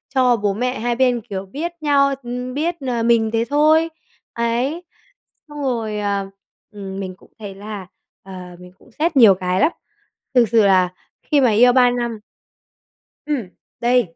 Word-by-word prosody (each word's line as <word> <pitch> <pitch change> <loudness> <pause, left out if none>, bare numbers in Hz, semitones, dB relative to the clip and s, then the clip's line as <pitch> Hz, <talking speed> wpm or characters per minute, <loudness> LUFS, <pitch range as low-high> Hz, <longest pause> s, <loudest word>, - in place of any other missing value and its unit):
cho 250 -2 +4
bố 205 -1 0
mẹ 250 +4 -2
hai 240 +1 -1
bên, 250 -1 +2
kiểu, 195 -3 -6
biết 300 - -5
nhau, 280 -2 +3
ừm, 250 +1 -5
biết, 325 +5 -1
ờ, 235 -2 -1
mình 230 -1 +3
thế 230 0 +1
thôi. 310 +3 +3 0.4
Ấy, 240 +8 -1 0.7
xong 295 -1 -8
rồi, 225 -5 -2
à, 200 -1 -1 0.5
ừm, 195 -2 -7
mình 185 -1 -6
cũng - - -23
thấy 200 -3 -8
là, 200 -2 -8 0.4
ờ, 195 - -12 0.3
mình 180 0 -13
cũng 250 - -21
xét 315 +3 -1
nhiều 215 -6 +8
cái 185 0 -1
lắm. 330 - +4 0.6
Thực 245 - +6
sự 225 -1 +4
là 185 -2 +4 0.3
khi 290 -2 +2
mà 245 - +4
yêu 245 +4 +5
3 250 -1 +5
năm 235 -2 -3 1.1
Ừm. 270 -11 -3 0.3
Đây. 240 -8 +1
235 Hz, 170 wpm, -20 LUFS, 205-260 Hz, 1.1 s, nhiều